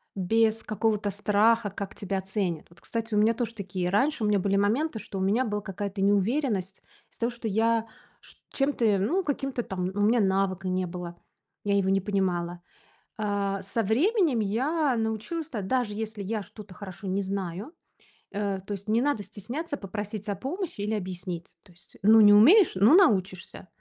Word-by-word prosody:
без 220 +4 +2
какого-то 215 -1 0
страха, 210 +1 +2
как 200 -1 -6
тебя 195 -1 -3
оценят. 190 -4 -3
Вот, 170 - -20
кстати, 230 -1 -4
у - - +2
меня 220 +2 +4
тоже 230 0 -3
такие 185 -3 -3
раньше 250 +4 +1
у - - +2
меня 205 -2 +3
были 195 +1 0
моменты, 225 +5 +1
что 195 - -7
у - - -2
меня 215 +7 +2
была 210 -1 -2
какая-то 195 +1 -5
неуверенность 200 0 0 0.3
из-за - - -21
того, 235 +1 +1
что 235 -1 -6
я 225 +2 +1 0.3
чт - - -18 0.2
чем-то, 235 -8 +2
ну, 345 - +1
каким-то 275 -5 -2
там, 185 -3 -4
ну, 195 +2 -3
у 205 - +4
меня 235 +2 +4
навыка 190 -2 +1
не 185 0 0
было, 175 -1 -7 0.5
я 200 -1 +1
его 190 -1 +1
не 195 0 +2
понимала. 175 -3 -1 0.6
А 200 -2 -1
со 210 +4 -2
временем 290 - +2
я 265 +8 +1
научилась, 225 +9 -2
та 220 -9 -4
даже 235 +1 -1
если 220 -1 -5
я 210 +1 -3
что-то 205 -1 -12
хорошо 195 0 -9
не 190 +2 0
знаю, 195 - -4 0.6
э, 200 -1 -2
то 205 - -4
есть 200 +1 -8
не 225 +2 +3
надо 270 -6 0
стесняться 285 - -6
попросить 205 +1 -6
о 200 - -1
помощи 320 - -5
или 210 +2 -1
объяснить. 180 -3 -6
То 190 - -20
есть, 175 - -19
ну, 220 +2 +7
не 205 0 +8
умеешь, 325 - +7
ну, 205 - +5
научишься. 190 - +2
205 Hz, 185 wpm, -27 LUFS, 195-230 Hz, 0.6 s, не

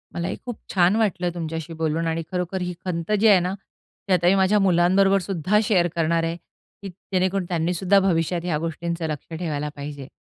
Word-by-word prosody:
मलाही 170 0 -2
खूप 245 -3 -5 0.2
छान 185 +2 +4
वाटलं 185 -5 0
तुमच्याशी 165 0 -5
बोलून 160 +1 0
आणि 165 0 -1
खरोखर 180 +1 -2
ही 180 0 -3
खंत 170 +2 -3
जी 225 - +4
आहे 200 -3 +7
ना, 180 +1 -2
ती 195 0 -7
आता 175 -1 +3
मी 190 - +5
माझ्या 195 +2 +3
मुलांबरोबर 195 +2 +4
सुद्धा 190 +3 +1
शेअर 185 -5 +3
करणार 165 0 +1
आहे 165 +1 -1
की 195 +3 -14
जेणेकरून 185 0 -2
त्यांनी 170 0 0
सुद्धा 190 +3 +3
भविष्यात 175 -2 0
ह्या 160 -4 0
गोष्टींचं 165 +1 -3
लक्ष 155 +2 -6
ठेवायला 150 -4 -3
पाहिजे. 140 -1 -7
175 Hz, 190 wpm, -23 LUFS, 165-190 Hz, 0.2 s, आहे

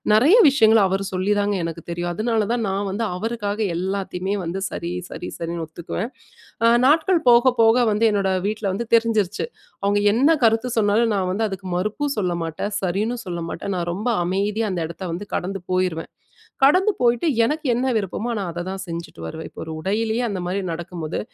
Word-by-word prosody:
நிறைய 280 - +6
விஷயங்கள் 225 -5 +5
அவரு 195 +1 -1
சொல்லிதாங்க 205 +2 +1
எனக்கு 165 0 -4
தெரியும். 175 0 -2
அதனால 225 +2 +1
தான் 235 -2 -1
நான் 195 +1 -1
வந்து, 210 +4 -2
அவருக்காக 210 +1 -2 0.2
எல்லாத்தையுமே 190 +1 -2
வந்து 170 +3 -3
சரி, 170 0 -4 0.2
சரி, - - -6
சரின்னு 170 0 -4
ஒத்துக்குவேன். 170 +6 -5 0.6
அ - - +7 0.2
நாட்கள் 325 +5 +4
போக, 240 +2 +6
போக 225 +1 +6
வந்து 210 +2 +1
என்னோட 200 -2 +1 0.2
வீட்ல 215 +1 -3
வந்து 200 +5 -2
தெரிஞ்சிருச்சு. 220 -3 +2 0.4
அவுங்க 200 +1 +2
என்ன 265 +7 +4
கருத்து 225 +1 +3
சொன்னாலும் 220 +1 +3
நான் 190 -2 0
வந்து 205 +4 0
அதுக்கு 195 -1 -7
மறுப்பும் 215 +10 -1
சொல்ல 185 -4 0
மாட்டேன். 165 +6 -4
சரின்னு 200 +6 -1
சொல்ல 175 -2 -4
மாட்டேன். 200 - -4
நான் 175 -1 -2
ரொம்ப 205 +7 -3 0.2
அமைதியா 205 +4 0
அந்த 180 -2 -2
இடத்த 170 +3 -8
வந்து 185 +5 -4
கடந்து 195 +2 -2
போயிருவேன். 185 -3 -1 0.6
கடந்து 370 +9 +4
போயிட்டு, 240 +5 +2 0.2
எனக்கு 305 +6 -2
என்ன 250 +2 0
விருப்பமோ 215 +3 -3
நான் 185 -4 -3
அத 175 +1 -5
தான் 190 0 -5
செஞ்சுட்டு 165 - -7
வருவேன். 160 - -7
இப்ப - - -9
ஒரு 160 - -6
உடையிலயே 220 +5 0
அந்த 195 -3 -3
மாதிரி 190 +2 -1
நடக்கும்போது, 165 -1 -5
200 Hz, 175 wpm, -22 LUFS, 180-225 Hz, 0.6 s, அ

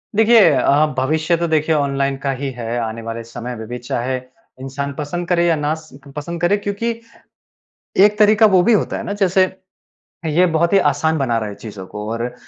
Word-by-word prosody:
देखिए 225 0 +6
अ, 145 +2 +3
भविष्य 155 +5 +1
तो 170 - -1
देखिए 160 0 +1
ऑनलाइन 140 -1 0
का 140 - 0
ही 140 0 -2
है 120 -1 -4
आने 115 0 -4
वाले 115 0 -6
समय 120 +2 -7
में 110 -1 -8
भी 120 +2 -5
चाहे, 125 +1 -3 0.4
इंसान 140 +1 -4
पसंद 160 +4 -4
करे 175 -1 +2
या 170 -1 +3
ना 150 0 -1
स 155 -3 -14 0.2
पसंद 170 +3 -5
करे 175 +4 +3
क्योंकि, 205 +3 -2 1.1
एक 205 +2 +5
तरीका 215 +1 +5
वो 190 -4 +5
भी 235 - +4
होता 210 - 0
है - - -5
ना 200 - -4
जैसे, 190 0 +4 0.8
ये 165 +4 +3
बहुत 170 +3 +1
ही 200 - +6
आसान 160 +3 0
बना 120 -4 0
रहा 110 -1 -3
है 105 - -7
चीज़ों 100 -3 -9
को 105 +2 -7
और 120 +1 -4
150 Hz, 200 wpm, -19 LUFS, 125-175 Hz, 1.1 s, देखिए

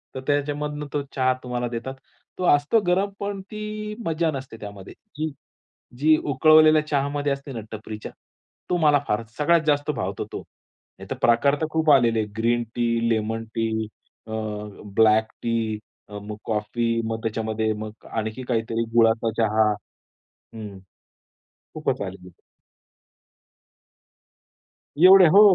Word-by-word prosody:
तर 130 - -4
त्याच्यामधून 145 +1 -1
तो 145 - 0
चहा 130 -1 +3
तुम्हाला 125 -1 -2
देतात. 120 +3 -5 0.4
तो 185 - -3
असतो 145 +11 +2
गरम, 190 +3 +2
पण 200 -1 -4
ती 215 0 -5
मज्जा 165 0 +1
नसते 135 -4 -7
त्यामध्ये. 100 -2 -9 0.2
की 155 0 -2 0.7
जी 155 +1 +5 0.2
उकळवलेल्या 155 +2 +6
चहामध्ये 145 0 0
असते 140 0 -4
ना 115 - -4
टपरीच्या. 110 0 -7 0.6
तो 180 - +2
मला 150 -3 +4
फारच 105 +1 -1
सगळ्यात 165 +2 +4
जास्त 145 0 +2
भावतो 95 -6 -3
तो. - - -4 0.6
नाहीतर - - -6
प्रकार 130 +5 +4
तर 160 - +1
खूप 160 -1 +1
आलेले 120 -5 +4
आहे 105 - -1
ग्रीन 120 +1 +1
टी, 115 -1 +1
लेमन 115 0 -1
टी, 110 -1 -1 0.4
अ, - - -8 0.6
ब्लॅक 110 0 +4
टी 115 -2 -1 0.3
अ, 105 - -7
मग 105 0 -6
कॉफी, 110 +2 -1 0.2
मग 110 0 -3
त्याच्यामध्ये 110 0 -1
मग 110 0 -9
आणखी 110 +3 -3
काहीतरी 115 0 0
गुळाचा 115 -1 +4
चहा. 110 0 +3 0.9
हं, 105 -3 -8 1.0
खूपच - - -2
आलेली 95 -2 -6
आहे. 90 - -18 2.6
एवढे 185 -1 +9
हो, 205 - +9
120 Hz, 135 wpm, -24 LUFS, 110-150 Hz, 2.6 s, एवढे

